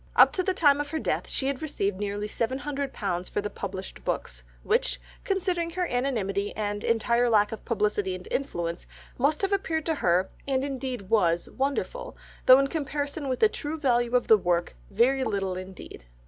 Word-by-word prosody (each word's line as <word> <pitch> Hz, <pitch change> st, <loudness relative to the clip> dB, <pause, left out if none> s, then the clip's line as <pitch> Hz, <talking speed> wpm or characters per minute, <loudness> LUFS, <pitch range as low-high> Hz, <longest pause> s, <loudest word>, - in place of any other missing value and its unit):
Up -, -, +7 dB
to 370 Hz, -, +1 dB
the 370 Hz, 0 st, 0 dB
time 290 Hz, -4 st, +4 dB
of 290 Hz, -, -5 dB
her 320 Hz, -, -2 dB
death -, -, -2 dB
she 265 Hz, -, -1 dB
had 275 Hz, -1 st, -1 dB
received 200 Hz, -11 st, -2 dB
nearly 205 Hz, 0 st, -2 dB
seven 230 Hz, +4 st, -1 dB
hundred 280 Hz, -1 st, -3 dB
pounds 185 Hz, -3 st, -3 dB
for -, -, -1 dB
the 205 Hz, 0 st, -3 dB
published 190 Hz, -1 st, -6 dB
books, -, -, -3 dB, 0.2 s
which, 480 Hz, +4 st, +1 dB, 0.2 s
considering 365 Hz, -3 st, 0 dB
her 360 Hz, +2 st, -1 dB
anonymity, 220 Hz, -, -1 dB
and 205 Hz, -1 st, -2 dB
entire 235 Hz, +1 st, +2 dB
lack 210 Hz, -2 st, +4 dB
of 225 Hz, -, -7 dB
publicity 210 Hz, -4 st, 0 dB
and 180 Hz, -, -10 dB
influence, 170 Hz, -11 st, -3 dB, 0.3 s
must 295 Hz, +8 st, +2 dB
have 390 Hz, +1 st, +1 dB
appeared 320 Hz, -5 st, -1 dB
to 325 Hz, -, +1 dB
her, 180 Hz, +2 st, +2 dB, 0.2 s
and 270 Hz, 0 st, +1 dB
indeed 260 Hz, -7 st, -4 dB
was, 175 Hz, -6 st, +2 dB
wonderful, 280 Hz, -, -2 dB, 0.3 s
though 255 Hz, -, +10 dB
in 275 Hz, -, +3 dB
comparison 285 Hz, 0 st, -3 dB
with 255 Hz, -, -2 dB
the 440 Hz, -, +8 dB
true 310 Hz, -6 st, -4 dB
value 245 Hz, -3 st, +2 dB
of 245 Hz, -, +3 dB
the 220 Hz, -, +7 dB
work 175 Hz, -1 st, 0 dB
very 250 Hz, +6 st, +3 dB
little 195 Hz, -6 st, -1 dB
indeed. 185 Hz, -, -9 dB
245 Hz, 190 wpm, -27 LUFS, 200-285 Hz, 0.3 s, though